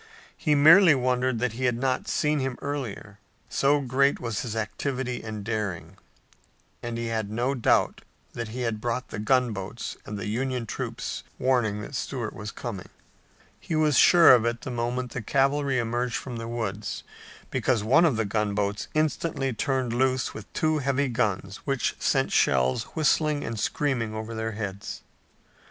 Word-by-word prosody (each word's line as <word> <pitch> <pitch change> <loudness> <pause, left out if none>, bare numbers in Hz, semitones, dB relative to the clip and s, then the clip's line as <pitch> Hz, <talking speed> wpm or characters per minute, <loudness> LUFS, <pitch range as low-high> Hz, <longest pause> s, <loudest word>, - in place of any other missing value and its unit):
He 150 -3 +1
merely 160 +3 +8
wondered 125 -1 +1
that 120 -1 -1
he 130 +3 -2
had 120 -2 +1
not 130 - -1
seen 150 -7 +1
him 130 -2 -2
earlier, 120 -7 -5 0.3
so 145 +1 +2
great 140 +2 +2
was 115 -4 -3
his 115 -3 -4
activity 125 +3 -3
and 110 -2 -6
daring, 100 -6 -3 0.9
and 120 -1 -4
he 115 - -3
had 110 -3 -2
no 120 +5 0
doubt 125 -4 +2 0.3
that 115 -1 -4
he 120 +4 -5
had 115 -3 -2
brought 120 +2 -2
the - - -5
gunboats 110 -3 -1
and 105 - -6
the 100 - -5
Union 125 +3 -2
troops - - -4 0.2
warning 120 -5 +1
that 105 - -8
Stuart 125 -4 -3
was 105 0 -6
coming. 110 -7 -6 0.7
He 165 - -4
was 155 -2 +3
sure 170 +2 +8
of 120 -3 +5
it 120 0 -1
the 130 - -5
moment 120 +1 -2
the 125 - -4
cavalry 135 +3 +1
emerged 120 0 -1
from 125 -3 -5
the 115 0 -5
woods, 110 -3 -4 0.5
because 120 -5 +1
one 135 +10 +5
of 160 -8 +3
the 110 - 0
gunboats 105 0 -1
instantly 155 -3 0
turned 130 0 -1
loose 130 +1 +1
with 110 - -10
two 155 -1 +1
heavy 140 0 0
guns 100 -4 -1
which 135 -4 -1
sent - - +1
shells 65 - +2
whistling 155 -1 +2
and 115 -1 -4
screaming 120 -5 -1
over 110 +1 -5
their 110 0 -3
heads. 100 -2 -6
120 Hz, 165 wpm, -26 LUFS, 110-135 Hz, 0.9 s, merely